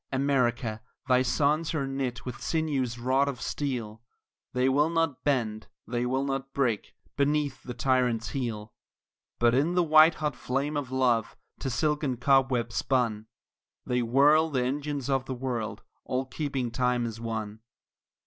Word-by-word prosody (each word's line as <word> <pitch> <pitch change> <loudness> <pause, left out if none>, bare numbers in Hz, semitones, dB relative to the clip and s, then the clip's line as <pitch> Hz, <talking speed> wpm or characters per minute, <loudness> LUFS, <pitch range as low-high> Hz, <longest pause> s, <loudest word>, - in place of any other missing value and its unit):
America, 125 -5 0 0.3
thy 125 -1 +4
sons 150 +5 +1
are 140 -3 0
knit 135 -2 -3
with 125 -1 -6
sinews 140 -7 -1
wrought 130 +3 +2
of 135 -3 -5
steel, 120 -8 -3 0.5
They 125 +1 +1
will 145 +4 +3
not 165 -5 0
bend, 115 -7 0 0.2
they 120 0 -1
will 130 +2 0
not 135 0 -3
break, 120 -7 -1 0.2
beneath 140 -1 0
the 125 - -7
tyrant's 125 -4 +1
heel; 115 -6 -4 0.6
But 120 0 +3
in 150 +7 +2
the 180 - +4
white 155 0 +6
hot 150 -3 -2
flame 140 +4 -2
of 145 -3 -2
love, 125 -4 +1 0.2
to 135 - -2
silken 150 0 0
cobwebs 125 -3 +2
spun, 115 -5 0 0.6
They 125 0 0
whirl 145 +7 +4
the 130 -4 0
engines 145 0 -2
of 135 -2 0
the 130 - -4
world, 120 -4 -4 0.2
all 130 +1 -2
keeping 135 -3 -3
time 125 0 +1
as 115 -1 -6
one. 110 -2 -4
130 Hz, 150 wpm, -28 LUFS, 120-140 Hz, 0.6 s, white